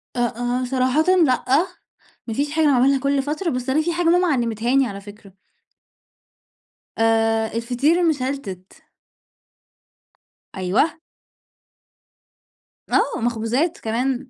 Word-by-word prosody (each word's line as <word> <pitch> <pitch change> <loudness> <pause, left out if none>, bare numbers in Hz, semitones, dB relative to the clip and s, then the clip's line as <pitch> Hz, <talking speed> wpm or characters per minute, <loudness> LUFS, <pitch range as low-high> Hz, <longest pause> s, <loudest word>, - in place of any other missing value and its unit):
أ - - -3
آآ 245 +1 -1
صراحةً 260 +4 +1 0.2
لأ، 255 -3 0 0.8
ما 225 - -3
فيش 285 +5 -2
حاجة 315 0 +1
أنا 290 - +4
باعملها 270 +2 +3
كلّ 280 +1 +1
فترة، 300 +6 -3
بس 255 -3 -3
أنا 300 +4 +2
في 340 +2 -2
حاجة 350 +1 -1
ماما 360 +1 +3
علّمتها 240 -4 0
لي 275 -1 +4
على 200 -4 -6
فكرة. 205 -1 -14 1.6
آآ 225 0 +2
الفطير 250 +8 +1
المشلتِت. 265 - -3 1.7
أيوة. 190 - +1 1.9
آه، - - +1
مخبوزات 240 +8 -1
كمان. 250 +3 -2
255 Hz, 115 wpm, -21 LUFS, 225-285 Hz, 1.9 s, أنا